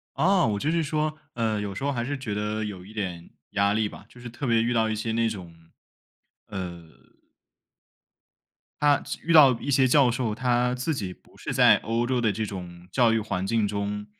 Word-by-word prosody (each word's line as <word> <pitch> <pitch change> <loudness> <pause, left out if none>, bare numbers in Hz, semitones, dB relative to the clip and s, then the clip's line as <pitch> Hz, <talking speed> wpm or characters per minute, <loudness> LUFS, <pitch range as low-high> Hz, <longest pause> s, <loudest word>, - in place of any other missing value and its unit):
啊， 185 -2 +3
我 105 -2 0
就 150 +9 0
是 165 0 +1
说， 155 +1 -1 0.2
呃， 110 -3 0
有 100 -1 -4
时 120 - -5
候 140 - +1
还 120 -2 -2
是 145 +3 -3
觉 110 -6 -4
得 105 +1 -2
有 95 -4 -6
一 105 - -13
点 90 -5 -5 0.2
压 100 0 +2
力 110 0 +1
吧， 105 - -12
就 120 - -16
是 120 - -8
特 120 +4 -5
别 115 -1 +3
遇 120 - 0
到 110 -2 +2
一 110 - -1
些 110 +1 -2
那 115 0 +1
种， 90 -6 -7 0.9
呃 85 -4 -7 1.9
他 145 -1 +4 0.2
遇 170 - +1
到 145 -5 +8
一 140 - -3
些 130 0 +4
教 130 -1 +5
授， 115 -3 -1
他 125 0 +1
自 130 +6 -2
己 95 -8 -4
不 - - -21
是 - - -5
在 - - +6
欧 115 +2 -1
洲 125 -1 0
的 110 - +2
这 110 +2 -3
种 90 -3 -8
教 120 -3 +4
育 115 - +2
环 95 -3 -3
境 115 0 +1
中， 105 0 -3
115 Hz, 225 characters per minute, -26 LUFS, 100-125 Hz, 1.9 s, 到